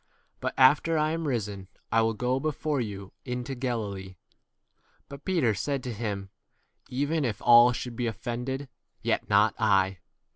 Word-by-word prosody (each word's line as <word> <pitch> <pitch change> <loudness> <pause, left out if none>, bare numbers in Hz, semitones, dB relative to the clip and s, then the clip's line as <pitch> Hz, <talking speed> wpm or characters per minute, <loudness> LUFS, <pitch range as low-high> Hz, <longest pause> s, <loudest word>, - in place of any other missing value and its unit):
But - - -3
after 145 +5 +5
I 155 0 +2
am 165 -1 -2
risen, 105 -7 -3 0.2
I 115 - +4
will 115 0 +1
go 125 +4 0
before 150 -1 -1
you 100 -4 -6
into 125 +1 -4
29 125 - -9
Galilee. 100 -7 -3 0.9
But 140 +1 -11
Peter 165 - +2
said 135 +6 -2
to 125 - -4
him, 100 -3 -4 0.6
Even 145 +5 0
if 115 -4 -2
all 120 0 +8
should 120 -1 -5
be 120 0 -1
offiended, 125 +3 -3
w - - -8
30 - - -27 0.3
yet - - 0
not - - +4
I. 95 -1 +2
125 Hz, 170 wpm, -28 LUFS, 105-140 Hz, 0.9 s, all